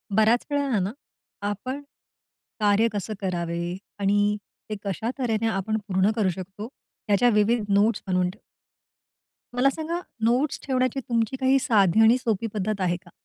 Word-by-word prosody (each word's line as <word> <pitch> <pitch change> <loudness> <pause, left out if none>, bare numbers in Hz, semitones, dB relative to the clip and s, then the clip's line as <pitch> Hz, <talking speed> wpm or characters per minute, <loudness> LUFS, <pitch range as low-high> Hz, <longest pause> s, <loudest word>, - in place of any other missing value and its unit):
बऱ्याच 220 +2 +4
वेळेला 280 -7 +1
ना, 190 +2 -1 0.6
आपण, 255 +7 -4 0.8
कार्य 210 +2 +4
कसं 205 +1 -3
करावे? 175 -1 -2 0.2
आणि 205 +1 +2 0.3
ते 215 - -2
कशा 200 +3 -2
तऱ्हेने 225 -3 0
आपण 215 0 -1
पूर्ण 190 +1 +2
करू 210 -5 +2
शकतो? 190 +4 -6 0.4
ह्याच्या 210 +4 +4
विविध 215 +2 +3
नोट्स 210 +3 +3
बनवून 180 -1 +1
ठेव 200 +4 -11 1.2
मला 255 +2 +4
सांगा, 320 +4 -3 0.2
नोट्स 250 +6 +2
ठेवण्याची 255 -1 +1
तुमची 230 -1 -1
काही 265 0 +4
साधी 210 -5 +4
आणि 225 +3 +6
सोपी 225 -3 -1
पद्धत 210 0 -2
आहे 175 -1 +1
का? - - -15
215 Hz, 145 wpm, -25 LUFS, 195-240 Hz, 1.2 s, आणि